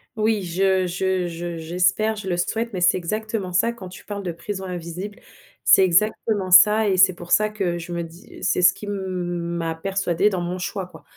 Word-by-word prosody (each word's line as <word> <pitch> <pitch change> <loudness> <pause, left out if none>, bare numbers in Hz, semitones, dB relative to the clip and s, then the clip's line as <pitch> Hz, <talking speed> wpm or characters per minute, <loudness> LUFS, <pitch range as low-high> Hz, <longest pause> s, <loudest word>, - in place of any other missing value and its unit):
Oui 215 -1 +1
je 185 +1 +1
je 185 0 -1
je 170 0 -5
j'espère, 180 +7 +1
je 210 -2 -7
le 175 -2 -1
souhaite. 225 +6 -2
Mais 185 - -3
c'est 175 +2 +4
exactement 210 +1 -3
ça 230 +6 +2
quand 225 -6 -10
tu 180 - -12
parles 200 -1 -6
de 180 - -3
prison 190 +3 -6
invisible, 180 +4 -6 0.4
c'est 190 - +6
exactement 200 +2 +1
ça 210 +4 +7
et 190 - +1
c'est 185 0 +6
pour 175 0 -11
ça 215 0 +4
que 195 -5 -2
je 170 +1 -8
me 170 0 -2
dis, 165 +2 -13
heu, - - -11
c'est 180 - +1
ce - - +7
qui - - -10
m - - -3
m'a 175 -3 -3
persuadée 190 +2 0
dans 185 -2 -2
mon 175 +1 -3
choix 185 +1 -4
quoi. 170 -3 -15
185 Hz, 215 wpm, -22 LUFS, 175-205 Hz, 0.4 s, ça